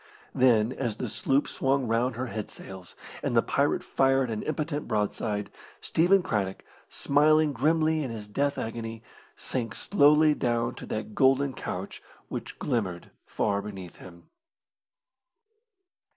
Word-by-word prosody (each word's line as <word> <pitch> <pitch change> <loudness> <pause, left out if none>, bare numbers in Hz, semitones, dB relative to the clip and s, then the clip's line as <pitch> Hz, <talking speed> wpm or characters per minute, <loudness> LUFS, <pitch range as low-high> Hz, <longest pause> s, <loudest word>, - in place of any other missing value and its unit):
Then, 120 -2 +4
as 120 -5 -3
the 125 - -3
sloop 135 +5 0
swung 135 -1 0
round 115 +2 +1
her 125 +2 -3
head 110 -4 -5
sails, 95 -2 -10 0.3
and - - 0
the - - +5
pirate - - +1
fired 135 -2 +2
an 110 - -3
impotent 150 0 -3
broadside, 105 0 -1 0.3
Stephen 180 +3 +3
Craddock, 95 -7 -2 0.3
smiling 150 +1 +3
grimly 155 +4 +2
in 130 - -4
his 110 -2 -6
death 140 +7 -1
agony, 115 0 -5 0.3
sank 120 -3 -4
slowly 150 -4 +4
down 120 -4 0
to - - -10
that 110 0 -4
golden 135 +2 +3
couch 95 -4 -6 0.3
which - - -6
glimmered 100 -10 -2 0.2
far 100 -1 0
beneath 95 -4 -8
him. 85 -2 -13
120 Hz, 135 wpm, -27 LUFS, 105-140 Hz, 0.3 s, the